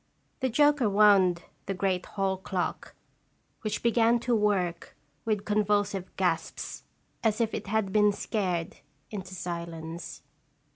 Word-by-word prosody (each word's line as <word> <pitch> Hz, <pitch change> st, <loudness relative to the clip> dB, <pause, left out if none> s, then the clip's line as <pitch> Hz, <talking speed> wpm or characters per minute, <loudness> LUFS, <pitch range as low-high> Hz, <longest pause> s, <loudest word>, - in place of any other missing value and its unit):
The 260 Hz, -, 0 dB
joker 290 Hz, -2 st, +4 dB
wound 195 Hz, -4 st, +5 dB, 0.2 s
the 195 Hz, -, -1 dB
great 185 Hz, -1 st, 0 dB
hall 195 Hz, -1 st, -1 dB
clock, 185 Hz, -1 st, -3 dB, 0.7 s
which 215 Hz, -2 st, -3 dB
began 235 Hz, 0 st, +4 dB
to 240 Hz, -1 st, +1 dB
work 195 Hz, -5 st, 0 dB, 0.3 s
with 210 Hz, -2 st, 0 dB
convulsive 205 Hz, -2 st, +1 dB
gasps, 180 Hz, -3 st, -1 dB, 0.4 s
as 220 Hz, -1 st, +2 dB
if 225 Hz, -1 st, +1 dB
it -, -, -4 dB
had 205 Hz, -2 st, 0 dB
been 210 Hz, -1 st, +5 dB
scared 185 Hz, -5 st, -2 dB, 0.3 s
into 190 Hz, -3 st, -6 dB
silence. 170 Hz, -1 st, -6 dB
200 Hz, 125 wpm, -28 LUFS, 180-215 Hz, 0.7 s, wound